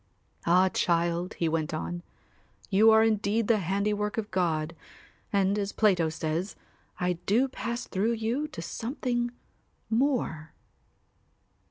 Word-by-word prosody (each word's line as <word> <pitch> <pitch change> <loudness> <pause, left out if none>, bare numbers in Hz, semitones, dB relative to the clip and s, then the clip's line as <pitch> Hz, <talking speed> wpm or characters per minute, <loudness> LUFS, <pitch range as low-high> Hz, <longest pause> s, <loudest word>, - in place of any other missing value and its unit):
"Ah, 180 +2 +5
child," 170 0 0
he 170 - 0
went 160 -1 -1
on, 175 +2 -4 0.7
"you 210 +3 +6
are 220 0 +6
indeed 215 0 +1
the 225 -3 +4
handiwork 205 +3 -1
of 215 -2 -3
God 165 -3 0 0.6
and, 200 0 +2
as 200 0 -2
Plato 185 -7 +3
says, 160 +4 -3 0.4
I 180 -1 0
do 235 +7 +3
pass 240 -1 -4
through 210 +5 0
you 230 +7 -1
to 165 - -8
something 240 - -2 0.6
more." 225 - 0
200 Hz, 125 wpm, -28 LUFS, 170-225 Hz, 0.7 s, you